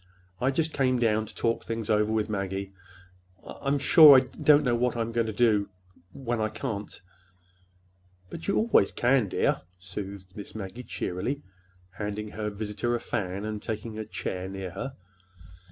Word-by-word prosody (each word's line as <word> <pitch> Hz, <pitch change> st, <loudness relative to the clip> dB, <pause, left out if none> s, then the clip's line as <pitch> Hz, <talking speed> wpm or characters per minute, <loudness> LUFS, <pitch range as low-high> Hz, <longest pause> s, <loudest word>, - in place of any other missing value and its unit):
I 130 Hz, -, +2 dB
just 155 Hz, +3 st, 0 dB
came 130 Hz, -2 st, +2 dB
down 110 Hz, -2 st, +1 dB
to -, -, -10 dB
talk 115 Hz, 0 st, 0 dB
things 115 Hz, -2 st, -4 dB
over 105 Hz, 0 st, +2 dB
with 110 Hz, -1 st, +1 dB
Maggie. 100 Hz, -1 st, -3 dB, 0.7 s
I—I'm 140 Hz, +1 st, -2 dB
sure 145 Hz, 0 st, +9 dB
I -, -, +6 dB
don't 145 Hz, +3 st, +3 dB
know 125 Hz, -, +1 dB
w 120 Hz, +1 st, +1 dB
what 125 Hz, -1 st, +1 dB
I'm 115 Hz, 0 st, -1 dB
going 115 Hz, -1 st, 0 dB
to -, -, -2 dB
do—when 100 Hz, +1 st, -1 dB
I 110 Hz, -, +1 dB
can't." 105 Hz, -5 st, -5 dB, 1.3 s
"But 165 Hz, -, -7 dB
you 200 Hz, -, +2 dB
always 230 Hz, +1 st, +4 dB
can, 120 Hz, -4 st, +2 dB
dear," -, -, +1 dB, 0.2 s
soothed 95 Hz, 0 st, -8 dB
Miss 105 Hz, 0 st, -9 dB
Maggie 105 Hz, +3 st, -6 dB
cheerily, 125 Hz, +5 st, -3 dB, 0.5 s
handing 105 Hz, 0 st, -4 dB
her 105 Hz, 0 st, -3 dB
visitor 105 Hz, +3 st, -2 dB
a -, -, -1 dB
fan 95 Hz, -1 st, -3 dB
and 105 Hz, -1 st, -4 dB
taking 110 Hz, 0 st, -5 dB
a -, -, -2 dB
chair 95 Hz, -3 st, -4 dB
near 95 Hz, -2 st, -5 dB
her. 130 Hz, +9 st, -6 dB
110 Hz, 165 wpm, -27 LUFS, 100-125 Hz, 1.3 s, sure